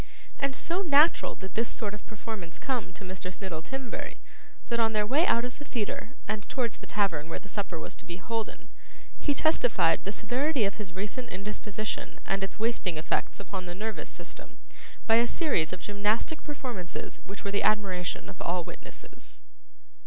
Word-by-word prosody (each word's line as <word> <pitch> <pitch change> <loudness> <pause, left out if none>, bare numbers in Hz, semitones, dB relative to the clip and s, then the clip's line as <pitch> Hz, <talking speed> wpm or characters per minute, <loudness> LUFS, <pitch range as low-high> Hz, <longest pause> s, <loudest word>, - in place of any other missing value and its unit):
And 275 -1 +1
so 345 +8 0
natural 310 -2 +6
did 190 -2 -8
this 230 +1 +2
sort 210 -3 -1
of 210 - -9
performance 215 -5 -5
come 255 -4 -1
to - - -9
Mr. 185 -1 -4
Snittle 180 -3 -3
Timberry, 265 +1 -4 0.5
that 235 -1 +2
on 225 -1 +4
their 210 -1 +3
way 290 - +4
out 235 +1 +4
of 250 - -6
the - - -5
theatre 235 -1 -2
and 215 -1 0
towards 240 -5 0
the - - -9
tavern 170 -7 +1
where - - -2
the 200 - -9
supper 190 -4 -2
was - - -5
to - - -10
be 175 0 -4
holden, 225 +4 -3 0.5
he 290 - +2
testified 245 - +4
the 200 - -1
severity 245 +4 +2
of 200 - -1
his 190 -3 -5
recent 210 +6 -3
indisposition 210 +2 -3
and 195 0 +1
its 195 - -3
wasting 215 -7 +1
effects 155 - 0
upon 195 -2 -4
the 175 - -4
nervous 215 +3 -3
system, - - -8 0.5
by 225 0 +7
a 235 +1 +5
series 240 - +2
of 185 0 -5
gymnastic 210 +9 +1
performances 245 - -4
which 200 +1 -6
were 200 - +1
the 200 - +3
admiration 190 -4 +2
of 195 - -9
all 175 0 +1
witnesses. - - -10
210 Hz, 180 wpm, -30 LUFS, 190-245 Hz, 0.5 s, by